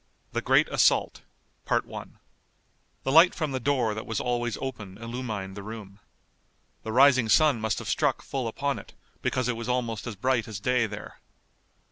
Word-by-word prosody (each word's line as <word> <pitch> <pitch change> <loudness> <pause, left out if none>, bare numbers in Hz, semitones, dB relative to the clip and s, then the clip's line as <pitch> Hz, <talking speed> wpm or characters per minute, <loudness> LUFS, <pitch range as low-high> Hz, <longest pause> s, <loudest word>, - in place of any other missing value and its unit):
THE - - -1
GREAT - - +4
ASSAULT - - +3 0.5
The 135 - -6
light 165 +5 +7
from 155 -4 -2
the 130 - -2
door 125 -4 +1
that 110 - -6
was 110 -2 -2
always 120 -1 -1
open 110 -8 -6
illumined 115 -5 -5
the 100 - -6
room. 105 -1 -9 0.8
The 110 - -5
rising 130 -1 +5
sun 140 0 +4
must 110 -1 0
have - - -6
struck - - +1
full 130 -4 -3
upon 140 +5 -2
it, - - -15 0.3
because 125 -2 0
it 125 - 0
was 115 +1 -5
almost 120 -3 -1
as 115 - -5
bright 125 +3 0
as 110 -4 -6
day 125 +2 +1
there. 105 -1 -9
120 Hz, 165 wpm, -27 LUFS, 110-130 Hz, 0.8 s, light